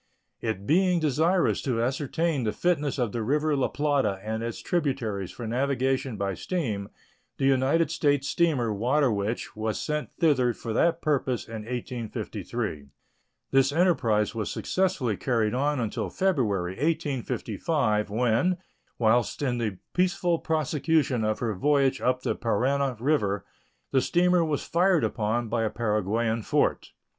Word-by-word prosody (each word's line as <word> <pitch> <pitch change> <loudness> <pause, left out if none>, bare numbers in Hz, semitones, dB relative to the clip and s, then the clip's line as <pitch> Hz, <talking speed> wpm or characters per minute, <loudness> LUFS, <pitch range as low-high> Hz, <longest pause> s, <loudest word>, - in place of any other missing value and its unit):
It 110 -4 -3
being 180 - +3
desirable 160 +5 +2
to 125 -5 -1
ascertain 145 +3 -1
the 110 - 0
fitness 150 -4 0
of 120 -5 0
the 115 - -3
river 150 +6 +1
La 135 - +1
Plata 145 -9 0
and 110 +1 -3
its 115 0 -4
tributaries 125 - -1
for 120 - -7
navigation 130 0 0
by 100 0 -1
steam, 105 - -3 0.5
the 135 - 0
United 135 +5 +3
States 145 -4 +1
steamer 135 -8 +1
Water 125 +6 +2
Witch 105 +3 -3
was 110 0 -2
sent 150 -1 -2
thither 130 -7 +3
for 115 - -5
that 165 +7 +2
purpose 135 -4 0
in 110 -2 -7
1853. 115 - -4 0.6
This 135 0 +4
enterprise 130 - +2
was 110 -3 -3
successfully 180 - 0
carried 115 -4 0
on 145 +2 0
until 115 -3 -2
February, 110 - 0
1855, 130 - -1
when, 120 - +1 0.4
whilst 120 +4 +2
in 125 -3 0
the 105 -5 -2 0.2
peaceful 180 -2 +1
prosecution 150 -4 +1
of 110 0 0
her 115 -3 0
voyage 140 +6 +2
up 125 0 +1
the - - 0
Parana 130 +3 0
River, 110 -7 0 0.5
the 135 - +3
steamer 180 +2 +3
was 155 -3 -1
fired 180 -1 +2
upon 115 +2 -1
by 115 +1 -1
a 110 - +1
Paraguayan 110 +1 0
fort. - - 0
130 Hz, 140 wpm, -27 LUFS, 110-150 Hz, 0.6 s, This